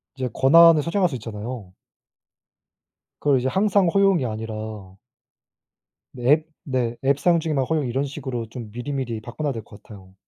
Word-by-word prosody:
이제 130 Hz, -1 st, -3 dB
권한을 165 Hz, +2 st, +6 dB
설정할 180 Hz, +3 st, +1 dB
수 140 Hz, -, -5 dB
있잖아요. 110 Hz, -3 st, -7 dB, 1.5 s
그걸 140 Hz, -3 st, +2 dB
이제 125 Hz, -, -1 dB
항상 195 Hz, +3 st, +2 dB
허용이 195 Hz, -5 st, +3 dB
아니라 110 Hz, -3 st, -6 dB, 1.2 s
네. 125 Hz, -, -10 dB
앱 155 Hz, +1 st, +3 dB, 0.2 s
네. 125 Hz, -4 st, -2 dB
앱 140 Hz, +1 st, +2 dB
사용 170 Hz, +1 st, +3 dB
시에만 155 Hz, -5 st, -1 dB
허용 150 Hz, -2 st, -1 dB
이런 130 Hz, +3 st, -1 dB
식으로 130 Hz, -5 st, -5 dB
좀 115 Hz, -3 st, -8 dB
미리미리 120 Hz, -1 st, -4 dB
바꿔 120 Hz, +7 st, -8 dB
놔야 145 Hz, -2 st, 0 dB
될 115 Hz, -3 st, -6 dB
것 105 Hz, 0 st, -15 dB
같아요. 95 Hz, -3 st, -14 dB
130 Hz, 320 characters per minute, -23 LUFS, 115-155 Hz, 1.5 s, 권한을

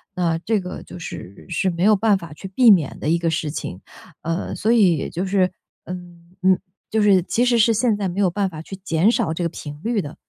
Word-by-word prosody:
那 170 Hz, -2 st, +1 dB
这 205 Hz, +5 st, 0 dB
个 180 Hz, 0 st, -7 dB
就 -, -, -11 dB
是 100 Hz, -, -9 dB
是 180 Hz, +2 st, 0 dB
没 170 Hz, 0 st, -2 dB
有 210 Hz, +1 st, +5 dB
办 210 Hz, 0 st, +3 dB
法 170 Hz, -4 st, -10 dB
去 155 Hz, +6 st, -8 dB
避 225 Hz, +5 st, +5 dB
免 165 Hz, -9 st, +2 dB
的 150 Hz, -, -2 dB
一 165 Hz, -, +3 dB
个 170 Hz, 0 st, 0 dB
事 160 Hz, -2 st, -2 dB
情。 95 Hz, -, -6 dB, 0.4 s
呃， 165 Hz, +3 st, -3 dB
所 220 Hz, -, +1 dB
以 200 Hz, -8 st, +5 dB
也 -, -, -3 dB
就 175 Hz, +3 st, -3 dB
是， 190 Hz, -1 st, +2 dB, 0.3 s
嗯 175 Hz, -1 st, -10 dB
嗯， 190 Hz, -1 st, +5 dB, 0.3 s
就 220 Hz, -, +1 dB
是 200 Hz, -3 st, +5 dB
其 235 Hz, +6 st, 0 dB
实 245 Hz, -1 st, +3 dB
是 230 Hz, +1 st, +5 dB
现 220 Hz, -1 st, +2 dB
在 200 Hz, -2 st, -1 dB
没 185 Hz, +3 st, -2 dB
有 190 Hz, -, +4 dB
办 195 Hz, +1 st, 0 dB
法 155 Hz, -3 st, -8 dB
去 195 Hz, +4 st, -9 dB
减 185 Hz, +1 st, +2 dB
少 160 Hz, -8 st, 0 dB
这 175 Hz, -, -3 dB
个 170 Hz, -, 0 dB
频 150 Hz, -2 st, -9 dB
率 230 Hz, -2 st, 0 dB
的。 145 Hz, -3 st, -8 dB
185 Hz, 265 characters per minute, -21 LUFS, 165-205 Hz, 0.4 s, 有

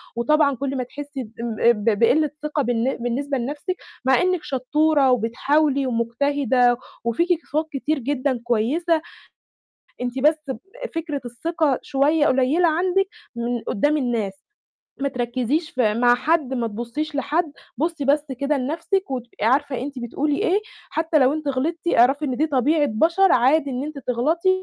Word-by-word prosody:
وطبعا 280 Hz, +3 st, +2 dB
كل 275 Hz, +1 st, -3 dB
ما 255 Hz, -, -1 dB
تحسّي 285 Hz, +1 st, -7 dB
ام 230 Hz, 0 st, -6 dB, 0.2 s
ب 210 Hz, -1 st, 0 dB
بقِلّة 295 Hz, +6 st, +4 dB
ثِقَة 300 Hz, -1 st, -1 dB
بالن 245 Hz, +1 st, 0 dB
بالنسبة 265 Hz, +4 st, -2 dB
لنَفْسِك 290 Hz, +9 st, -3 dB, 0.3 s
مع 265 Hz, +3 st, +4 dB
إنِّك 365 Hz, -3 st, +1 dB
شطّورة 285 Hz, +1 st, +2 dB
وبتحاولي 270 Hz, +4 st, +1 dB
ومجتهدة، 245 Hz, +1 st, +1 dB, 0.3 s
وفيكِ 235 Hz, +10 st, 0 dB, 0.2 s
صفات 310 Hz, +2 st, -1 dB
كتير 285 Hz, +2 st, -1 dB
جدًا 260 Hz, -1 st, -1 dB
كويسة، 300 Hz, +9 st, +1 dB, 1.0 s
أنتِ 250 Hz, +1 st, -3 dB
بس 300 Hz, 0 st, +2 dB, 0.4 s
فكرة 310 Hz, -4 st, -3 dB
الثِقَة 290 Hz, +3 st, -1 dB
شوية 295 Hz, +2 st, +2 dB
قليّلة 270 Hz, +7 st, +3 dB
عندِك 365 Hz, +4 st, +1 dB, 0.3 s
من 235 Hz, 0 st, -2 dB
قُدّام 295 Hz, +8 st, +1 dB
الناس. 235 Hz, -7 st, -1 dB, 0.7 s
ما 280 Hz, -, +1 dB
تركِّزيش 255 Hz, +6 st, -1 dB
في 220 Hz, -5 st, +1 dB
مع 240 Hz, +1 st, +4 dB
حد، 280 Hz, 0 st, 0 dB
ما 235 Hz, -2 st, -1 dB
تبُصّيش 240 Hz, +8 st, -4 dB
لحد، 305 Hz, +3 st, 0 dB, 0.2 s
بُصّي 320 Hz, 0 st, -2 dB
بس 295 Hz, +2 st, +2 dB
كده 285 Hz, +1 st, +1 dB
لنَفْسِك 325 Hz, +6 st, -2 dB
وتبقي 240 Hz, -4 st, -4 dB
عارفة 265 Hz, 0 st, +1 dB
أنتِ 275 Hz, -1 st, -6 dB
بتقولي 285 Hz, +5 st, -1 dB
إيه، 380 Hz, +4 st, +2 dB, 0.3 s
حتّى 320 Hz, -1 st, +1 dB
لو 260 Hz, +1 st, +4 dB
أنتِ 305 Hz, -2 st, -3 dB
غلطتِ 320 Hz, +6 st, -2 dB
اعرفي 270 Hz, +5 st, +4 dB
إن 255 Hz, -3 st, -1 dB
دي 310 Hz, -, +2 dB
طبيعة 290 Hz, +2 st, +2 dB
بَشَر 335 Hz, -, +3 dB
عادي 275 Hz, +4 st, +3 dB
إن 255 Hz, +1 st, -3 dB
أنتِ 300 Hz, -1 st, -6 dB
تغلطي 275 Hz, +8 st, 0 dB
275 Hz, 150 wpm, -22 LUFS, 245-310 Hz, 1.0 s, بقِلّة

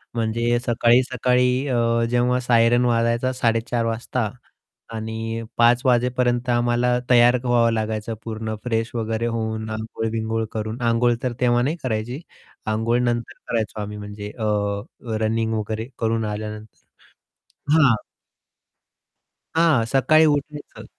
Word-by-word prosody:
म्हणजे 115 Hz, +1 st, 0 dB
सकाळी-सकाळी 125 Hz, +1 st, +2 dB, 0.2 s
अ, 115 Hz, -2 st, +1 dB
जेव्हा 125 Hz, +1 st, +2 dB
सायरन 120 Hz, 0 st, +3 dB
वाजायचा 115 Hz, +2 st, +1 dB
4:30 115 Hz, -1 st, 0 dB
वाजता 115 Hz, 0 st, -2 dB, 0.6 s
आणि 110 Hz, +1 st, -4 dB, 0.2 s
5:00 120 Hz, +1 st, +5 dB
वाजेपर्यंत 125 Hz, 0 st, +1 dB
आम्हाला 120 Hz, +1 st, +2 dB
तयार 120 Hz, 0 st, +6 dB
व्हावं 120 Hz, -1 st, +3 dB
लागायचं 110 Hz, 0 st, -2 dB
पूर्ण 110 Hz, -1 st, -4 dB
फ्रेश 115 Hz, -1 st, -1 dB
वगैरे 115 Hz, 0 st, -2 dB
होऊन 110 Hz, -1 st, -3 dB
आंघोळ-बिंघोळ 110 Hz, 0 st, -3 dB
करून, 110 Hz, +2 st, -4 dB
आंघोळ 120 Hz, +1 st, +2 dB
तर 125 Hz, -, -1 dB
तेव्हा 120 Hz, -1 st, +3 dB
नाही 150 Hz, +6 st, 0 dB
करायची. 120 Hz, +2 st, -2 dB, 0.5 s
आंघोळ 110 Hz, +2 st, +1 dB
नंतर 120 Hz, +1 st, -1 dB
करायचो 110 Hz, -2 st, -2 dB
आम्ही 105 Hz, 0 st, -6 dB
म्हणजे 105 Hz, 0 st, -7 dB
अ, 110 Hz, -, -1 dB, 0.8 s
रनिंग 110 Hz, +1 st, 0 dB
वगैरे 110 Hz, +1 st, -3 dB
करून 115 Hz, 0 st, 0 dB
आल्यानंतर. 105 Hz, 0 st, -8 dB, 0.9 s
हां. 140 Hz, -7 st, +5 dB, 1.6 s
हां, 160 Hz, -7 st, +4 dB
सकाळी 155 Hz, +4 st, +5 dB
उठायचं. 145 Hz, 0 st, -2 dB
115 Hz, 115 wpm, -22 LUFS, 110-125 Hz, 1.6 s, तयार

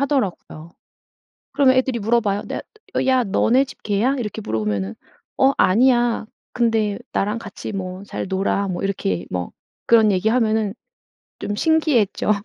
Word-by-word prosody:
하더라고요. 200 Hz, -, -2 dB, 0.8 s
그러면 265 Hz, -2 st, +4 dB
애들이 260 Hz, -2 st, +1 dB
물어봐요. 210 Hz, -2 st, +1 dB
"냐 -, -, -3 dB, 0.4 s
야 260 Hz, -1 st, +3 dB
너네 230 Hz, +5 st, +3 dB
집 -, -, -14 dB
개야?" 220 Hz, +7 st, +1 dB
이렇게 220 Hz, -2 st, -4 dB
물어보면은 105 Hz, -, -2 dB, 0.4 s
"어 270 Hz, +1 st, +4 dB
아니야. 240 Hz, +2 st, +3 dB, 0.3 s
근데 225 Hz, -4 st, +1 dB
나랑 210 Hz, +3 st, 0 dB
같이 210 Hz, -2 st, -8 dB
뭐 185 Hz, -1 st, -5 dB
잘 200 Hz, -, -5 dB
놀아." 195 Hz, +1 st, 0 dB
뭐 180 Hz, 0 st, -4 dB
이렇게 95 Hz, -, -2 dB
뭐 90 Hz, -1 st, -3 dB, 0.3 s
그런 220 Hz, -3 st, +5 dB
얘기하면은 220 Hz, +1 st, +1 dB, 0.7 s
좀 205 Hz, -, -3 dB
신기해 315 Hz, 0 st, +3 dB
했죠. 205 Hz, +1 st, -1 dB
215 Hz, 300 characters per minute, -21 LUFS, 195-245 Hz, 0.8 s, 그런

